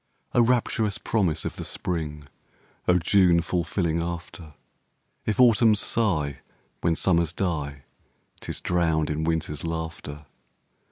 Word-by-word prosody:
O 120 - +5
rapturous 115 -3 +1
promise 85 -8 0
of - - -4
the - - -4
Spring! 75 -4 -3 0.6
O 90 - +5
June 90 0 +4
fulfilling 85 -1 -1
after! 85 -2 -6 0.7
If 110 - 0
Autumns 115 -3 +5
sigh, 75 - 0 0.4
when 85 -1 +1
Summers 85 -2 +2
die, 75 -7 -3 0.6
'Tis - - -5
drowned 80 -3 +1
in 80 +1 -2
Winter's 80 -3 -1
laughter. 80 -2 -5
85 Hz, 115 wpm, -25 LUFS, 80-95 Hz, 0.7 s, O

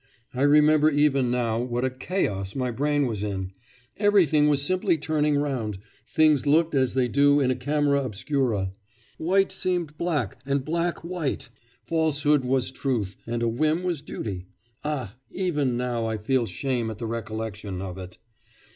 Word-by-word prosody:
I 130 - -3
remember 150 +1 +5
even 140 -4 +2
now 120 -2 0
what 120 +1 -1
a 130 - 0
chaos 105 - -2
my 125 -2 -1
brain 145 +3 +1
was 110 -5 -2
in; 95 -3 -3 0.5
everything 185 -8 +4
was 140 -1 +2
simply 180 +1 +1
turning 150 -1 +1
round 125 -8 -2 0.3
things 155 -4 +3
looked 160 +3 +3
as 130 -3 +2
they 130 -2 +2
do 145 +3 +4
in 130 -2 +2
a - - 0
camera 140 +2 +1
obscura 115 -4 -1 0.5
white 190 +4 +2
seemed 175 -5 -2
black 145 - -1
and 140 0 -1
black 170 +2 -1
white; 170 -8 -3 0.4
falsehood 150 -2 +2
was 130 0 0
truth, 120 -8 -2
and 120 0 -2
a - - +2
whim 155 +9 +1
was 175 -5 -1
duty.... 95 -9 -6 0.4
Ah! 135 -9 -4
even 150 -10 -1
now 120 -2 -1
I 110 0 -2
feel 120 +3 0
shame 120 +4 -2
at 110 - -6
the 115 - -5
recollection 110 -3 -5
of 95 -1 -6
it! 90 -1 -9
135 Hz, 160 wpm, -25 LUFS, 115-150 Hz, 0.5 s, remember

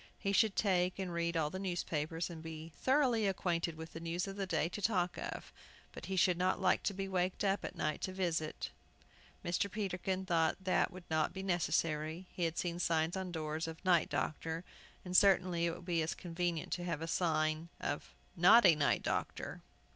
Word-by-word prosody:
He 200 - -1
should 205 0 +3
take 185 -3 +2
and 185 -3 -3
read 170 0 0
all 150 -2 0
the 185 - -4
newspapers, 170 -3 -2
and 165 - -7
so - - -14
be 160 0 -7
thoroughly 250 - +2
acquainted 170 -3 -1
with 160 +1 -9
the 165 - -6
news 170 +3 -2
of 195 - -5
the 195 -1 -3
day 160 -2 +1
to 195 +4 -6
talk 180 -4 +1
of. - - -6 0.4
But - - -9
he 190 - -2
should 180 -1 +3
not 185 +1 +2
like - - +3
to - - -7
be 195 0 -3
waked 185 0 0
up 195 0 +1
at - - -5
night 155 -3 -1
to 185 - -2
visit. 170 -4 -2 0.7
Mr. 175 +3 0
Peterkin 190 -2 -2
thought 165 -3 +2
that 185 - +2
would 185 0 -10
not 155 -1 +1
be 190 - -5
necessary. 165 -2 0
He 175 - -1
had 165 0 -2
seen 175 -1 -2
signs 165 0 +1
on 190 -1 -3
doors 160 -1 -3
of 160 +3 -8
"Night 175 -3 +4
Doctor," 160 +2 -2 0.4
and 180 0 -4
certainly 180 -3 +5
it 170 - -2
would 175 - -12
be 170 -2 +1
as 160 - -1
convenient 175 -1 -2
to 175 - -3
have 165 -3 -2
a - - -3
sign 160 -1 0
of - - -3 0.3
"Not 200 +7 +7
a 175 - +9
Night 145 -2 +1
Doctor." - - -3
175 Hz, 205 wpm, -35 LUFS, 165-190 Hz, 0.7 s, a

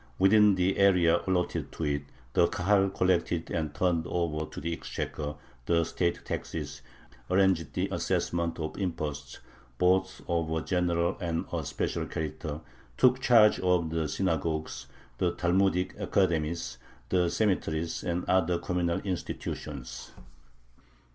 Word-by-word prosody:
Within 105 +1 +6
the 95 +1 +1
area 90 -3 +5
allotted 90 -1 0
to - - -5
it 70 -1 -1 0.3
the 85 - +5
Kahal 95 +3 +2
collected 90 -3 0
and 80 -3 -1
turned 85 +2 0
over 80 -3 -1
to - - -7
the 85 +2 -2
exchequer 75 -2 -4 0.3
the 85 -1 +3
state 85 +1 -1
taxes, 70 -4 -5 0.5
arranged 95 -4 +2
the - - 0
assessment 85 -1 -1
of 80 +3 -4
imposts, 75 -7 -4 0.4
both 95 +2 +2
of 85 -2 0
a 80 0 -1
general 85 -2 0
and 85 -2 -1
a - - -1
special - - -2
character, 75 -1 -4 0.4
took 125 0 +5
charge 115 -5 +6
of 90 -3 +1
the 80 -1 0
synagogues, 80 -6 -2 0.3
the 85 -1 +1
Talmudic 90 +1 +2
academies, 85 -9 0 0.3
the 90 -2 +2
cemeteries, 85 -6 0
and 90 +1 -2
other 90 -2 +2
communal 85 -1 -1
institutions. 75 -7 -5
85 Hz, 130 wpm, -29 LUFS, 80-95 Hz, 0.5 s, Within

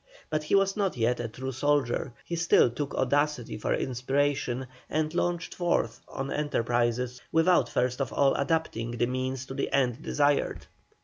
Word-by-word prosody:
But 155 - +1
he 150 - +1
was 195 0 +3
not 195 -8 0
yet 120 +1 +1
a 120 - -2
true 130 +4 -5
soldier; 135 -1 0
he 170 - -3
still 170 -7 +4
took 140 +4 -4
audacity 145 -1 0
for 105 - -3
inspiration, 130 0 0 0.2
and 155 0 0
launched 175 -1 -1
forth 175 -1 0
on 135 +1 -5
enterprises 120 -3 0
without 165 +3 +4
first 125 +2 0
of 135 - -2
all 140 -1 +3
adapting 130 -6 -1
the 120 - +2
means 130 +1 -2
to 135 - -7
the - - -2
end 130 -1 +1
desired. 145 -2 +1
135 Hz, 165 wpm, -28 LUFS, 125-150 Hz, 0.2 s, still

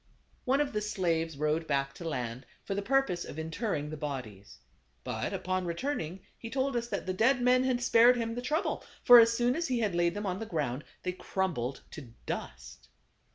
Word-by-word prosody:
One 265 +2 +2
of 285 -4 -2
the 210 - 0
slaves 165 -7 -1
rowed 155 +2 0
back 135 0 0
to 170 - -5
land, 125 -2 -4 0.2
for - - -3
the 200 - -1
purpose 225 -7 +1
of - - -9
interring 160 -1 -3
the 155 - -5
bodies. 125 -9 -6 0.5
But - - -3
upon 185 -1 -2
returning 180 - -3 0.2
he 230 - -7
told 265 +1 -1
us 235 0 -1
that - - -3
the 185 - -1
dead 235 +7 +3
men 250 +1 +4
had 250 -2 0
spared 240 +1 +6
him 230 -1 -2
the 245 - -4
trouble; 300 +7 -1 0.2
for 245 -1 +10
as 230 0 +6
soon 245 +1 +2
as 335 +1 -1
he 255 -2 0
had 210 -4 0
laid 170 0 +1
them 205 0 -3
on 185 0 -2
the 225 - -5
ground, 145 - -2 0.2
they 180 - -1
crumbled 165 -10 -2
to 125 -7 -10
dust. - - -7
185 Hz, 200 wpm, -30 LUFS, 150-240 Hz, 0.5 s, for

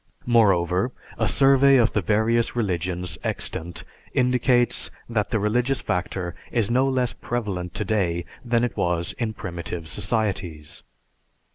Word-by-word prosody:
Moreover, 95 -3 +3 0.3
a 110 - +2
survey 135 +3 +5
of 120 -2 +4
the 105 - 0
various 110 +6 +1
religions 90 -5 -2
extant 85 +1 -3 0.3
indicates 125 -1 +2 0.2
that 110 -3 -1
the 115 - +1
religious 120 +6 +1
factor 90 -1 -2 0.2
is 115 -3 +1
no 130 +3 +3
less 125 -2 0
prevalent 100 -7 -4
today 95 -5 0 0.2
than 120 -1 +1
it 120 - -1
was 85 -1 0
in 115 -3 -1
primitive 85 -3 -6
societies. 95 -7 -2
110 Hz, 125 wpm, -24 LUFS, 90-120 Hz, 0.3 s, survey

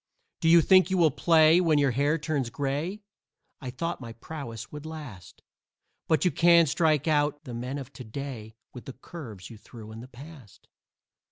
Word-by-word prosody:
Do 165 - +1
you 170 0 +7
think 185 +2 +5
you 190 - 0
will 165 -4 +4
play 160 +4 +4
when 160 -4 +2
your 140 -2 +2
hair 145 +5 +1
turns 150 -5 -2
gray? 145 - -3 0.6
I 130 - -6
thought 165 +5 -4
my 115 -2 -8
prowess 115 -3 -8
would 150 -1 -8
last, 150 - -10 0.6
But 155 -1 +2
you 180 - +3
can't 170 -1 +5
strike 155 0 +1
out 145 -1 +1
the 125 -5 -8
men 125 +4 -5
of 140 -1 -9
to 130 - -9
day 115 -2 -8 0.2
With 125 - -11
the 135 - -8
curves 120 - -10
you 110 - -12
threw 110 -1 -12
in 110 - -9
the 120 - -10
past!" 135 - -14
145 Hz, 185 wpm, -27 LUFS, 125-160 Hz, 0.6 s, you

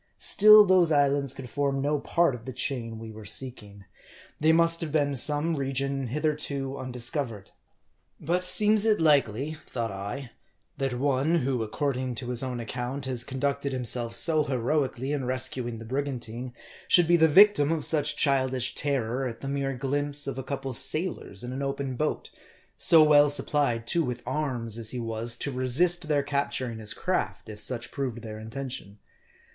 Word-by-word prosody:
Still, 215 0 +7
those 180 -3 +4
islands 140 -2 +2
could 130 - -9
form 140 +1 -1
no 145 +2 0
part 170 0 +1
of 115 -2 -9
the 130 - -6
chain 120 -3 -3
we 110 0 -8
were 110 0 -11
seeking. 105 -3 -7 0.5
They 155 +1 +4
must 165 +1 +3
have 160 -3 -3
been 145 -2 +1
some 150 +4 +1
region 135 -1 -2
hitherto 140 -1 -2
undiscovered. 125 -3 -5 0.7
But 175 +3 -1
seems 210 +2 +4
it 220 -1 +3
likely, 145 -1 +2
thought 115 -3 -3
I, 105 +7 -6 0.5
that 135 -2 -1
one, 140 +4 +1
who, 130 -6 0
according 130 +2 -2
to 125 +1 -4
his 120 - -1
own 130 -2 -4
account, 125 +4 -4
has 125 -2 0
conducted 140 +1 -2
himself 120 -2 +1
so 155 -2 +4
heroically 135 0 -1
in 145 -3 -2
rescuing 130 -2 -1
the 115 - -9
brigantine, 125 -2 -4 0.3
should 175 - +5
be 175 - +5
the 160 -1 +5
victim 165 -3 +6
of 160 -3 -1
such 150 -2 0
child 135 -3 +2
ish 125 -1 0
terror 130 -2 -1
at 115 -2 -8
the 135 - -5
mere 135 -1 -2
glimpse 145 +2 -1
of 140 - -3
a 135 - -5
couple 135 0 -4
of 125 - -5
sailors 155 - -2
in 125 +1 -5
an 135 - -4
open 135 -1 -3
boat, 150 +4 -3 0.4
so 160 -2 +6
well 145 -1 +6
supplied, 140 -5 0
too, 165 +8 +1
with 125 -3 -4
arms, 125 -5 -3
as 110 -1 -1
he 125 - -3
was, 115 0 -2
to 140 - -4
resist 155 +7 +1
their 145 -2 +1
capturing 140 -5 -2
his 105 -1 -3
craft, - - -2
if 105 -1 -9
such 120 +1 -5
proved 125 -5 -4
their 110 -1 -7
intention 110 -3 -7
135 Hz, 175 wpm, -27 LUFS, 120-145 Hz, 0.7 s, Still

